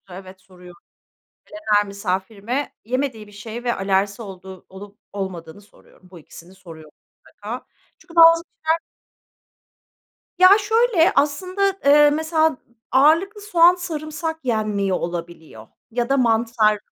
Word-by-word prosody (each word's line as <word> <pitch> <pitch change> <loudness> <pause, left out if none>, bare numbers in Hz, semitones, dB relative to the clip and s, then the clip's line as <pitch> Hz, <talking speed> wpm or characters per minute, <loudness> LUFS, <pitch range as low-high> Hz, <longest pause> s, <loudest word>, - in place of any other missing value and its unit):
Evet, 185 0 -12
soruyorum. 180 -2 -16 0.8
Gelen 215 -9 -1
her 205 0 +2
misafirime 200 +6 -4
yemediği 250 -3 -3
bir 205 - -18
şey 225 +4 -9
ve 240 - 0
alerjisi 195 +3 -1
olduğu 190 -2 -11
olup 200 +2 -13
olmadığını 190 -3 -7
soruyorum. 190 -2 -23
Bu 180 - -13
ikisini 170 +3 -15
soruyorum 160 -4 -14 0.3
mutlaka. 220 +5 -9 0.3
Çünkü 340 -1 -18
bazı 330 0 +7
kişiler 320 0 -2 1.6
Ya, 370 - +8
şöyle: 440 -4 +2
Aslında, 370 +7 0
eee, 295 +1 +6
mesela 315 -1 0 0.3
ağırlıklı 330 +10 +3
soğan 355 -3 +4
sarımsak 320 -2 -5
yenmiyor 210 -5 -1
olabiliyor 170 -9 -7 0.2
ya 240 +1 -2
da 275 - +2
mantar 225 -3 +2
225 Hz, 120 wpm, -21 LUFS, 190-315 Hz, 1.6 s, Ya